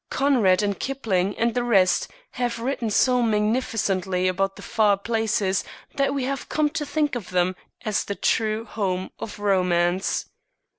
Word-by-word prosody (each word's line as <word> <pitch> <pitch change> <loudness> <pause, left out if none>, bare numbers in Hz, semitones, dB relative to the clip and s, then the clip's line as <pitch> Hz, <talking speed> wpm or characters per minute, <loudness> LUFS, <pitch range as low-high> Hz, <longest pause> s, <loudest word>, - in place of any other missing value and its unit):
Conrad 230 -9 +3
and 200 -2 -1
Kipling 205 -8 -1
and 235 0 +1
the 245 - 0
rest 190 -7 +3 0.2
have 240 -2 -2
written 235 -1 -2
so 250 +4 +3
magnificently 210 -5 0
about 195 +1 0
the - - -11
far 210 -3 +2
places 210 -3 0 0.3
that 275 -1 +1
we 275 -2 -1
have 275 +1 -3
come 300 -1 +1
to 295 -1 -3
think 295 0 0
of 240 -7 -4
them 180 0 +1 0.3
as 210 -1 0
the 200 - -4
true 220 +1 0
home 190 -5 -2
of 215 - -6
romance. 180 -2 +1
215 Hz, 155 wpm, -24 LUFS, 190-245 Hz, 0.3 s, Conrad